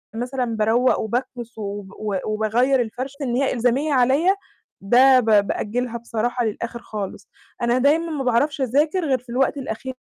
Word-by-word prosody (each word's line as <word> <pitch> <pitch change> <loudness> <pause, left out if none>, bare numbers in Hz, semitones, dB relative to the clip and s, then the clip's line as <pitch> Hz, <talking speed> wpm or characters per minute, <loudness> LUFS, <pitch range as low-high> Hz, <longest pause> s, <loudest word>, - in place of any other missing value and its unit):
مثلًا 250 +2 -2
باروّق 230 +2 +2
وباكنس 235 +1 -4
وب 200 -2 -6
وب 205 -3 -2
وباغيّر 230 +5 +1
الفرش 255 +4 -5
إن 245 -3 -1
هي 270 0 +1
إلزامية 255 +5 +1
عليَّ، 275 +9 +3 0.5
ده 255 +5 +6
ب 245 - -2 0.2
بأجلها 235 +2 -2
بصراحة 235 +1 -2
للآخر 230 +2 -4
خالص. 200 -2 -7 0.3
أنا 240 +1 +2
دايمًا 305 +6 +2
ما 290 -3 -2
باعرفش 270 +4 +1
أذاكر 300 +8 +1
غير 265 -3 +2
في 250 - -22
الوقت 265 +4 0
الأخير 260 -1 -5
245 Hz, 155 wpm, -22 LUFS, 225-270 Hz, 0.5 s, ده